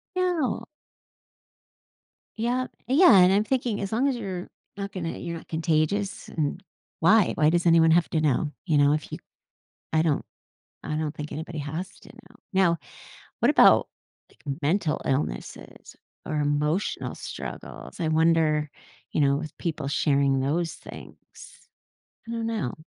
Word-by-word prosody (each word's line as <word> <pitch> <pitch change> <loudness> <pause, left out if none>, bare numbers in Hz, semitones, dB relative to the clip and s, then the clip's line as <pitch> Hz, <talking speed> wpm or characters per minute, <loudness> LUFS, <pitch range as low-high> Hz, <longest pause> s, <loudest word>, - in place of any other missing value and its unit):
No. 355 -7 0 1.7
Yep. 245 +3 -1 0.2
Uh, 260 - +1
yeah, 285 - +7
and 180 +1 +6
I'm 205 +2 +3
thinking, 240 -4 -1
as 195 - -4
long 245 +5 +2
as 270 - 0
you're 190 -6 -5 0.3
not 200 0 -5
gonna 175 -4 -4
you're 170 -1 -5
not - - -13
contagious, 165 +5 -1
and 155 +4 -2 0.4
Why? 205 +4 +5
Why 155 0 +4
does 175 +1 +1
anyone 165 -1 +5
have 170 +1 +3
to 160 - 0
know? 150 +1 +1
You 155 -4 +2
know, 145 0 +5
if 150 - -3
you - - -4 0.8
I 160 0 +3
don't 155 -3 0 0.6
I 150 - -3
don't 155 -1 -2
think 150 0 -7
anybody 160 +1 -6
has 155 +6 -4
to - - -16
know. - - -17 0.2
Now, 185 -3 +3 0.6
what - - +4
about, - - +6 0.4
like, - - -27 0.2
mental 160 +1 +1
illnesses, 130 - -4 0.3
or 155 - -2
emotional 150 +5 -1
struggles? - - -8
I 165 - 0
wonder, 155 -1 +2 0.4
you - - 0
know, 140 0 +3
with 155 +1 -6
people 155 -4 -3
sharing 140 -2 +2
those 165 +4 -1
things. - - -11 1.1
I 230 - -6
don't 230 -1 -3
know. 220 - -2
165 Hz, 150 wpm, -26 LUFS, 150-200 Hz, 1.7 s, yeah